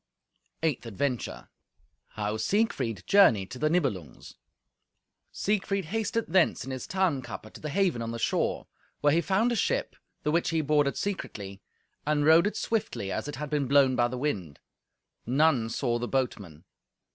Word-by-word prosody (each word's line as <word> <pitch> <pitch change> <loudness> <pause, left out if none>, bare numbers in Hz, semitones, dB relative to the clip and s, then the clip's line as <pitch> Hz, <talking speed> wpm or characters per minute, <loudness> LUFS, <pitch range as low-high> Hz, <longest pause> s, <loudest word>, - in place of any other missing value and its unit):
Eighth 145 -7 0
Adventure 115 - -3 0.7
How 105 0 -2
Siegfried 120 - 0
Journeyed 115 - +5
to 130 - -7
the 155 - +2
Nibelungs 115 - -2 1.0
Siegfried 200 -2 -1
hasted 225 +5 -1
thence 180 -5 +2
in 135 - -6
his 130 -1 -5
Tarnkappe 155 - -2
to - - -12
the 155 - -4
haven 180 -7 +1
on 115 - -3
the 115 - -4
shore, 115 - 0 0.4
where 145 0 +4
he 170 - +3
found 200 +7 +1
a - - +1
ship, 215 - 0 0.3
the 150 - +1
which 170 +2 +1
he 165 -1 +1
boarded 145 -1 +2
secretly, 100 - -5 0.4
and 145 -1 +1
rowed 165 +4 +6
it 210 - -3
swiftly, 215 - -2
as - - -3
it 145 - -5
had 150 0 -6
been 145 -3 0
blown 135 -1 +4
by 120 -1 +3
the 125 +1 -5
wind. 100 - -3 0.7
None 135 -3 +3
saw 120 0 -1
the 120 - -3
boatman. 100 - -3
145 Hz, 160 wpm, -28 LUFS, 115-170 Hz, 1.0 s, rowed